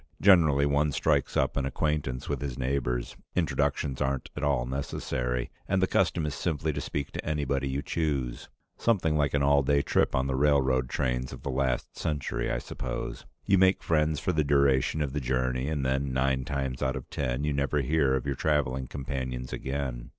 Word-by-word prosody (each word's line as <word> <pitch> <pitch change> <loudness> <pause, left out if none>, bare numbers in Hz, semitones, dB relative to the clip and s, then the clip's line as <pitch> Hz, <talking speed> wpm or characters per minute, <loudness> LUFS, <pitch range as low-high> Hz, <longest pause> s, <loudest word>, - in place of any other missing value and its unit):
Generally, 80 -8 +5
one 70 +1 +2
strikes 70 -1 +1
up - - +1
an 70 - 0
acquaintance 70 -2 -1
with 70 -2 -2
his 70 -4 -4
neighbors; 65 -2 -1 0.2
introductions 70 -3 0
aren't 65 -1 -1
at - - -5
all 70 -4 +1
necessary, 60 -2 -2 0.2
and 95 -1 +2
the 95 - +4
custom 85 -3 +1
is 75 - -2
simply 80 -1 -1
to - - -3
speak 70 -1 -4
to - - -5
anybody 70 -3 -1
you 70 +2 -2
choose 70 -7 -2 0.3
something 90 -9 +2
like 75 -1 +1
an 70 - +2
all 70 0 +5
day 70 +1 +2
trip - - +2
on 65 0 +1
the 65 - -1
railroad 65 -2 +2
trains 65 -2 -1
of - - -9
the 70 - -2
last 65 -1 -1
century, 75 -4 -2
I - - 0
suppose. 65 0 -5 0.2
You 95 -1 +4
make 95 0 +4
friends 75 -2 +2
for - - 0
the 80 -3 +1
duration 70 +1 +3
of 70 -2 -3
the 75 - -1
journey, 65 +1 0
and 75 -3 -1
then, 65 +1 0
nine 65 0 +1
times 70 -3 -3
out 65 0 0
of - - -6
ten, 65 +2 -1
you 75 -1 0
never 70 +1 +1
hear 70 -1 +2
of 65 - -2
your 70 - 0
traveling 65 -2 0
companions 65 -2 -4
again. 65 -3 -4
70 Hz, 195 wpm, -28 LUFS, 65-75 Hz, 0.3 s, Generally